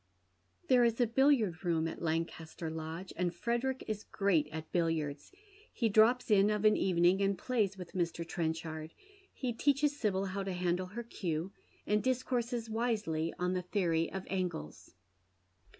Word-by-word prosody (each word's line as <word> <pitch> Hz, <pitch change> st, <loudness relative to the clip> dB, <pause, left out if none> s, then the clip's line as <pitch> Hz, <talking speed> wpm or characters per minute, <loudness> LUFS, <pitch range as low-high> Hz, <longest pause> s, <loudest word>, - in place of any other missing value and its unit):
There 250 Hz, -2 st, +5 dB
is 230 Hz, 0 st, +2 dB
a 245 Hz, -, +5 dB
billiard 230 Hz, -, +2 dB
room 165 Hz, -2 st, +1 dB
at 165 Hz, -, -6 dB
Lancaster 160 Hz, 0 st, -3 dB
Lodge, 160 Hz, +3 st, -6 dB
and 175 Hz, 0 st, 0 dB
Frederick 240 Hz, +8 st, -1 dB
is 215 Hz, -1 st, -3 dB
great 180 Hz, -7 st, +1 dB
at 155 Hz, +1 st, -7 dB
billiards. 160 Hz, -4 st, -1 dB, 0.4 s
He 230 Hz, -3 st, 0 dB
drops 220 Hz, +3 st, +4 dB
in 200 Hz, 0 st, +5 dB
of 210 Hz, 0 st, 0 dB
an 215 Hz, -, +6 dB
evening, 180 Hz, +1 st, +3 dB
and 195 Hz, -1 st, +2 dB
plays 210 Hz, -7 st, 0 dB
with 180 Hz, -2 st, -8 dB
Mr. 170 Hz, -2 st, -2 dB
Trenchard; 160 Hz, -1 st, -3 dB, 0.4 s
he 250 Hz, -3 st, -3 dB
teaches 285 Hz, +4 st, +2 dB
Sibyl 200 Hz, -7 st, 0 dB
how 195 Hz, +1 st, -3 dB
to 195 Hz, -1 st, -3 dB
handle 180 Hz, 0 st, 0 dB
her 230 Hz, +6 st, -6 dB
cue, 175 Hz, -6 st, -3 dB, 0.3 s
and 210 Hz, 0 st, +2 dB
dis 255 Hz, +1 st, 0 dB
courses 240 Hz, -2 st, -2 dB
wisely 215 Hz, -8 st, -1 dB
on 180 Hz, +1 st, 0 dB
the 185 Hz, -, 0 dB
theory 175 Hz, -3 st, 0 dB
of 190 Hz, -1 st, -5 dB
angles. 180 Hz, -, -4 dB
190 Hz, 160 wpm, -33 LUFS, 165-225 Hz, 0.4 s, an